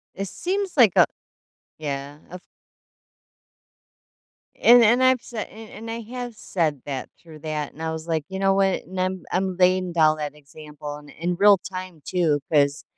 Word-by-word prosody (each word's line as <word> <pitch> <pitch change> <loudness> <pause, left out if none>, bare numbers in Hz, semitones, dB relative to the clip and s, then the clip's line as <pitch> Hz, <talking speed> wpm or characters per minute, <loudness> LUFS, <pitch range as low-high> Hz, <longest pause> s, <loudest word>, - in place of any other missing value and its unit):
It 195 0 -4
seems 385 - -3
like 230 - +6
a - - +7 0.7
Yeah, 145 -1 -5
of 180 0 -8 2.2
And 240 +1 +8
and 240 +4 +4
I've 255 -1 +4
sai 225 -3 -5
and 220 0 -13 0.2
and - - -4
I 230 +1 -4 0.2
have 245 -1 -5
said 155 - -2
that 135 -2 -4
through 160 -2 -14
that, 150 -1 -4
and 160 - -10
I 160 - -1
was, 160 +1 -6
like, 160 -3 -1
you 190 - -5
know 195 0 +3
what? 195 -1 +2
And 185 0 -6
I'm 185 -1 -1
I'm 185 0 0
laying 185 -1 +3
down 155 -2 +3
that 150 -1 -4
example 150 0 -9
in 150 - -15
in 175 +4 -3
real 200 0 +7
time 185 -4 -8
too 165 -6 +1
'cause, 140 -1 +2
180 Hz, 175 wpm, -24 LUFS, 150-195 Hz, 2.2 s, And